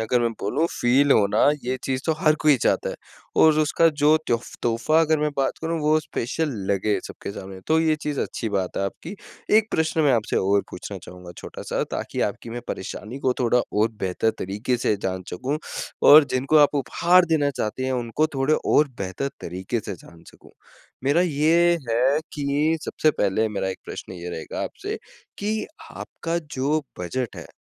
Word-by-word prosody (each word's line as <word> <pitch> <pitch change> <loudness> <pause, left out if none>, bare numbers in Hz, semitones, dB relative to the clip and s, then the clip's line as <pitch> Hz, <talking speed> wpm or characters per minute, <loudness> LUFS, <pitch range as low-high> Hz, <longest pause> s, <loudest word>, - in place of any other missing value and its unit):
अगर 120 +2 +1
मैं 115 -1 +1
बोलूँ 145 +11 0
फील 135 +4 +2
होना 100 -1 +3 0.3
ये 130 +1 -1
चीज़ 130 0 -1
तो 160 - +3
हर 155 -1 +4
कोई 150 -3 +5
चाहता - - +1
है। - - -5 0.4
और 155 -1 +6
उसका 155 +2 +3
जो 150 +2 +6
तोफ 120 -1 0 0.2
तोहफ़ा 120 +7 +2
अगर 160 -1 +2
मैं 150 0 0
बात 135 -1 0
करूँ 165 0 -1
वो 155 +1 +3
स्पेशल 155 +2 -2 0.2
लगे 100 +1 +1
सबके - - -8
सामने, 95 -1 -9
तो 160 +1 +3
ये 160 -1 +2
चीज़ 150 -2 -2
अच्छी 115 - -3
बात 95 -3 -2
है 100 - 0
आपकी। 165 - -6 0.4
1 220 0 +3
प्रश्न 160 0 +1
मैं 145 -4 +4
आपसे 115 -3 0
और 100 +1 +2
पूछना - - -7
चाहूँगा 90 -1 -11
छोटा-सा - - -4
ताकि - - -4
आपकी 115 - -9
मैं 120 +1 -5
परेशानी 105 +6 -6
को 130 -2 +1
थोड़ा 125 0 +3
और 110 +2 +2
बेहतर 95 +4 0
तरीके 105 +6 -2
से 115 -3 +1
जान 95 -1 -2
सकूँ 135 +11 -2 0.5
और 150 0 +10
जिनको 135 +4 +2
आप 145 0 +5
उपहार 175 +6 +3
देना 155 -4 +1
चाहते 130 0 -3
हैं 130 - -1
उनको 125 +5 0
थोड़े 135 +3 +2
और 150 -1 +2
बेहतर 100 +8 -3
तरीके 95 +7 -3
से 100 - -6
जान 85 -1 -16
सकूँ। - - -19 0.5
मेरा 145 +5 +3
ये 170 +1 +3
है 130 +6 +3
कि 150 +3 0
सबसे 155 - +1
पहले 110 -1 0
मेरा 95 -2 -2
1 95 - -5
प्रश्न - - -8
ये 90 -1 -7
रहेगा 80 - -5
आपसे, - - -5 0.4
कि 215 +1 -2 0.2
आपका 170 0 -4
जो 145 +4 +1 0.2
बजट 120 +7 -3
है, - - -8
130 Hz, 185 wpm, -24 LUFS, 105-155 Hz, 0.5 s, और